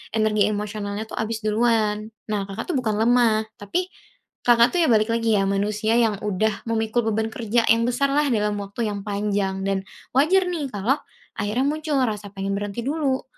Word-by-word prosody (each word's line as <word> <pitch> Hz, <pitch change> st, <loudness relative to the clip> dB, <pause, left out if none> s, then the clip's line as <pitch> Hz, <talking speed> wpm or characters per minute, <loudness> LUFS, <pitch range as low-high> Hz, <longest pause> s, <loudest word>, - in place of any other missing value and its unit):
energi 215 Hz, -2 st, +3 dB
emosionalnya 210 Hz, 0 st, -3 dB
tuh 220 Hz, -, -7 dB
habis 220 Hz, 0 st, -3 dB
duluan. 215 Hz, -1 st, +1 dB, 0.2 s
Nah, 200 Hz, -2 st, -1 dB
Kakak 200 Hz, -, -5 dB
tuh -, -, -2 dB
bukan 220 Hz, -4 st, -1 dB
lemah, 225 Hz, 0 st, +3 dB, 0.2 s
tapi 360 Hz, -, -2 dB, 0.6 s
Kakak 235 Hz, 0 st, +6 dB
tuh 355 Hz, -, +1 dB
ya 325 Hz, -, +4 dB
balik 220 Hz, -1 st, +3 dB
lagi 230 Hz, -1 st, +2 dB
ya 195 Hz, -, +2 dB
manusia 210 Hz, +3 st, +1 dB
yang 225 Hz, -3 st, +2 dB
udah 210 Hz, +1 st, 0 dB
memikul 225 Hz, +1 st, 0 dB
beban 220 Hz, +1 st, 0 dB
kerja 225 Hz, +1 st, 0 dB
yang 230 Hz, +1 st, +4 dB
besar 245 Hz, +4 st, +1 dB
lah 290 Hz, +2 st, +2 dB
dalam 210 Hz, -2 st, +1 dB
waktu 205 Hz, +3 st, -3 dB
yang 200 Hz, -1 st, -4 dB
panjang, 200 Hz, -2 st, -1 dB
dan 195 Hz, -1 st, 0 dB, 0.3 s
wajar 360 Hz, +7 st, +4 dB
nih 315 Hz, -7 st, -3 dB
kalo 210 Hz, +6 st, +1 dB, 0.4 s
akhirnya 210 Hz, +5 st, 0 dB
muncul 305 Hz, 0 st, -1 dB
rasa 210 Hz, -4 st, -2 dB
pengen 195 Hz, 0 st, -3 dB
berhenti 205 Hz, +3 st, -4 dB
dulu, 275 Hz, -1 st, 0 dB
220 Hz, 180 wpm, -23 LUFS, 205-240 Hz, 0.6 s, Kakak